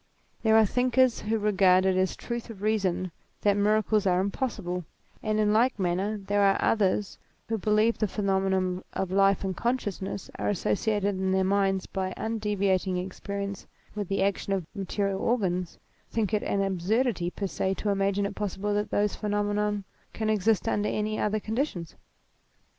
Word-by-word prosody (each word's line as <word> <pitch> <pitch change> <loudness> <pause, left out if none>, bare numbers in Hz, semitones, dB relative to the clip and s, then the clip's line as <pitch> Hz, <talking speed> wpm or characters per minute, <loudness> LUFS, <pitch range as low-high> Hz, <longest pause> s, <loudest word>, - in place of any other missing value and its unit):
There 220 -1 +5
are 220 - +6
thinkers 250 +2 +2
who 220 +1 -1
regard 190 -3 +4
it 190 -1 +3
as 185 0 +1
a - - -26
truth 235 0 -5
of 205 -3 -9
reason 190 -4 0 0.3
that 205 -1 +3
miracles 210 0 +2
are 180 -1 +3
impossible; 195 -3 -2 0.4
and 215 0 0
in 210 -1 +3
like 240 +3 +3
manner 190 +3 0
there 205 0 0
are 195 -1 +4
others 200 -2 +1 0.3
who 225 -1 -1
because 215 +3 +2
the 215 - +2
phenomena 190 -2 0
of 190 -1 -2
life 195 +1 +3
and 190 -1 -2
consciousness 205 -6 -3
are - - 0
associated 205 0 0
in 190 0 0
their 190 0 +2
minds 195 -1 +1
by 185 -1 -3
undeviating 200 -4 0
experience 200 +2 -5 0.3
with 205 -2 -3
the 195 0 0
action 200 0 0
of 190 -4 -1
material 195 0 -2
organs, 185 -7 0 0.3
think 220 -2 -1
it 210 - +2
an 200 0 0
ab 190 -2 -1
surdity 205 -2 +1
per 200 - -2
se 190 0 -1
to 210 - -2
imagine 200 0 +1
it 200 - -3
possible 205 0 -2
that 210 0 -1
those 205 0 +1
phenomena 205 0 -1 0.3
can 220 -1 -1
exist 215 +1 +2
under 210 -1 +1
any 215 0 -1
other 215 +1 +1
conditions. 220 - -3
200 Hz, 170 wpm, -27 LUFS, 190-215 Hz, 0.4 s, are